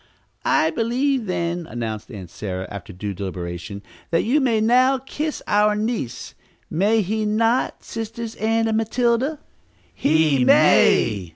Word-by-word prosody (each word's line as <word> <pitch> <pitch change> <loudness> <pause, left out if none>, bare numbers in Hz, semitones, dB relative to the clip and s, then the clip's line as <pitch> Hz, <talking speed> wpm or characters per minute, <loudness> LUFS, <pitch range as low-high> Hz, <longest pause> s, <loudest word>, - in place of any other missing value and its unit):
"I 160 - +3
believe, 245 - 0
then," 170 -1 -2
announced 115 -4 -5
Aunt 95 -8 -9
Sarah, 95 -2 -5
after 100 0 -8
due 100 +2 -5
deliberation, 90 0 -6 0.3
"that 165 - +1
you 280 +7 +2
may 235 -4 +2
now 255 +4 +4
kiss 295 +4 -5
our 210 0 +3
niece; 215 - -3 0.4
may 210 +6 +2
he 215 +3 -2
not, 225 +4 0
Sisters 225 0 -6
Ann 225 +1 +1
and 220 -1 +1
Matilda?" 240 +6 0 0.6
"He 155 -4 +2
may!" 100 -6 +4
210 Hz, 130 wpm, -22 LUFS, -, 0.6 s, now